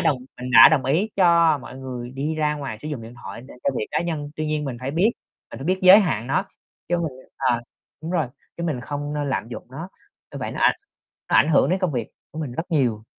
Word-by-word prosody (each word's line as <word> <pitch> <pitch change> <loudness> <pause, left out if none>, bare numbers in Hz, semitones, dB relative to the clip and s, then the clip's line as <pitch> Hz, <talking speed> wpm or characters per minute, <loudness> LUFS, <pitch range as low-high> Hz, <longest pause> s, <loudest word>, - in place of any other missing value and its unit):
đồng 155 -5 +2 0.2
mình 125 - -5
đã 125 - +10
đồng 145 -5 +2
ý 170 +11 +1
cho 170 -4 +5
mọi 130 0 -10
người 125 -2 -6
đi 145 +4 -3
ra 150 -1 +1
ngoài 135 -7 -5
sử 155 - -5
dụng 135 -7 -5
điện 115 +2 -10
thoại 100 +4 -7
để - - -12
cho 140 - +3
việc 105 - -2
cá - - 0
nhân. 150 -4 -3
Tuy 155 0 -2
nhiên 150 -1 -1
mình 130 -3 -4
phải 130 +2 -3
biết, 180 +9 +3 0.4
mình - - -8
phải 135 - -7
biết 185 +2 +1
giới 185 +2 +10
hạn 120 - -1
nó, 135 - +1 0.4
chứ 175 - +2
mình 165 -4 -2 0.2
ờ, 125 -3 +1 0.4
đúng 165 - -5
rồi, 165 -6 +1 0.3
chứ 170 - -5
mình 145 -7 -2
không 145 +2 -4
nên 145 -1 -2
lạm 115 - -2
dụng 120 - -8
nó. 160 +7 -7 0.4
Như - - -6
vậy - - -4
nó - - -6
ảnh - - +5 0.6
nó - - +5
ảnh 145 - +5
hưởng 160 +1 +4
đến 190 - +2
công 185 -5 0
việc 120 -4 -2 0.2
của 155 - -9
mình 140 -6 -4
rất 165 +7 -5
nhiều. 120 -9 +1
145 Hz, 260 wpm, -23 LUFS, 130-165 Hz, 0.6 s, đã